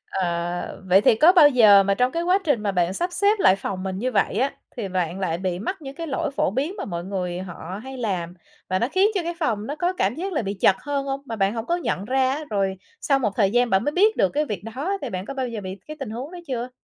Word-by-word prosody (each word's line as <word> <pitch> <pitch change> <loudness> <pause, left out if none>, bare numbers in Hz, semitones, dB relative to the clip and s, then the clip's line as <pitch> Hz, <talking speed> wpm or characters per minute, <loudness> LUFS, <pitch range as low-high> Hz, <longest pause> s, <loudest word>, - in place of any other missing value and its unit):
Ờ, 175 0 -2
vậy 190 +2 +6
thì 220 - +5
có 320 +9 +7
bao 310 -6 +7
giờ 215 -6 +7
mà 200 0 +2
trong 250 +5 +1
cái 335 +1 -2
quá 360 +2 +3
trình 285 -9 +1
mà 205 - +1
bạn 180 -1 +1
sắp 350 - -2
xếp 405 +3 +2
lại 190 - +5
phòng 190 -1 -5
mình 190 -1 -3
như 255 +4 -1
vậy 200 -4 +1
á, 265 +4 +1 0.2
thì 220 -5 -3
bạn 180 -1 -2
lại 170 -4 -1
bị 180 -1 -2
mắc 330 - -4
những 275 -1 -8
cái 330 +2 -5
lỗi 280 0 -2
phổ - - +2
biến 290 - -2
mà - - -4
mọi 170 -3 -4
người 180 -2 -3
họ 185 0 -7
hay 265 0 -8
làm 185 -7 -2 0.4
và 185 - +1
nó 235 - +1
khiến 385 +4 +4
cho 380 - +1
cái 340 +1 -3
phòng 220 -9 -1
nó 290 - -3
có 350 +3 0
cảm 240 - 0
giác 370 +4 -4
là 295 - 0
bị 200 -2 -3
chật 195 0 +3
hơn 280 -1 -2
hông, 275 0 -3
mà 230 -4 -5
bạn 195 +1 +1
hổng 225 -1 -4
có 345 - +1
nhận 200 - -2
ra 260 +2 +2
á? 295 +3 -3
Rồi 195 -2 0 0.3
sau 275 -2 +2
một 220 -6 0
thời 200 -4 +2
gian 245 +1 +2
bạn 195 0 +2
mới 295 - 0
biết 415 +7 +3
được - - +3
cái 300 +1 0
việc 210 - -4
đó, 360 +10 -1
thì 275 - -4
bạn 185 -2 -4
có 275 - -6
bao 260 -2 -2
giờ 230 -3 -5
bị 190 0 -6
cái 305 0 -8
tình 270 -5 -5
huống 250 +8 -6
đó 360 - -8
chưa? 250 -2 -3
230 Hz, 290 wpm, -23 LUFS, 190-290 Hz, 0.4 s, có